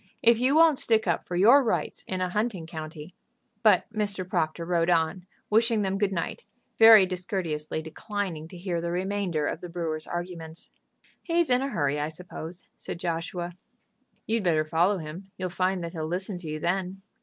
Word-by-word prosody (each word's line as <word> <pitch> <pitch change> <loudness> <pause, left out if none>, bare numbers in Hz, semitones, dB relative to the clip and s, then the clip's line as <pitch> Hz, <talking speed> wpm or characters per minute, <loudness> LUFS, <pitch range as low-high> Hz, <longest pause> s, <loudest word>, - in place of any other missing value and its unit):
If 230 0 +5
you 260 +4 +3
won't 320 -3 +6
stick 220 -1 +2
up 170 -3 -1
for 175 - -3
your 235 +10 +7
rights 230 - -1
in 185 -1 -3
a 185 - 0
hunting 210 -4 -1
county 160 0 -8 0.2
" - - -45
But - - +5
Mr. 200 -4 -1
Proctor 170 -2 -1
rode 170 0 +1
on, 170 +2 +1 0.2
wishing 225 0 +3
them 195 0 -1
good 205 -1 +1
night, 190 - -3 0.4
very 225 -3 +9
discourteously 175 -4 -3
declining 165 0 -4
to 180 - -11
hear 175 -2 -2
the 170 - -2
remainder 180 -3 -1
of 155 - -3
the 180 - -7
brewer's 165 -2 -4
arguments. 175 -2 -6 0.5
"He's 335 -4 +1
in 250 +1 +4
a 275 - -1
hurry, 145 - 0
I 150 +1 -1
suppose," 170 +1 -8
said - - -6
Joshua. 175 +1 -3 0.7
"You'd 225 +1 0
better 160 -4 +2
follow 175 +6 +2
him. 170 +4 -8
You'll 185 -1 -3
find 185 0 0
that 170 - -4
he'll 160 -2 -3
listen 180 +2 -2
to 170 - -9
you 155 0 -4
then." 185 +3 -2
180 Hz, 185 wpm, -27 LUFS, 165-205 Hz, 0.7 s, very